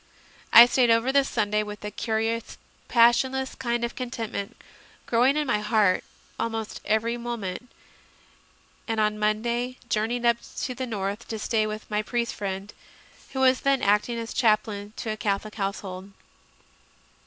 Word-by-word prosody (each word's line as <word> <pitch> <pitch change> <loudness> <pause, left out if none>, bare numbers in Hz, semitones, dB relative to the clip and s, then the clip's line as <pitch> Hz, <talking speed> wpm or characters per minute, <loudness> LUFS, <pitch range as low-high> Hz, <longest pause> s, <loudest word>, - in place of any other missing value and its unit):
I 235 - +11
stayed 245 0 +2
over 230 +3 +3
the 280 0 +4
Sunday, 210 -5 0
with 210 0 -7
a 210 - -4
curious, 225 +1 -2 0.3
passionless 260 +3 +3
kind 240 -2 -2
of 235 - -2
contentment 230 -5 -5 0.5
growing 250 +5 +3
in 300 - +1
my 210 -6 +1
heart 210 -3 +2 0.4
almost 225 -1 -3
every 225 +2 +1
moment, 235 -2 -5 1.2
and 225 -1 -1
on 215 0 +2
the 210 - -10
Monday 235 +4 0
journeyed 235 +3 0
up 235 0 +4 0.2
to 255 - -2
the 260 0 -4
north 205 0 -4
to 225 - -4
stay 215 0 0
with 215 0 -6
my 210 0 +1
priest 235 +2 -2
friend, 195 0 -5 0.6
who 265 - -1
was 260 -1 +4
then 275 -1 +2
acting 210 +4 +2
as 230 0 -5
chaplain 215 -2 +1
to 225 - -3
a 215 - -4
Catholic 210 0 -2
household. 195 -2 -4
225 Hz, 155 wpm, -26 LUFS, 210-240 Hz, 1.2 s, I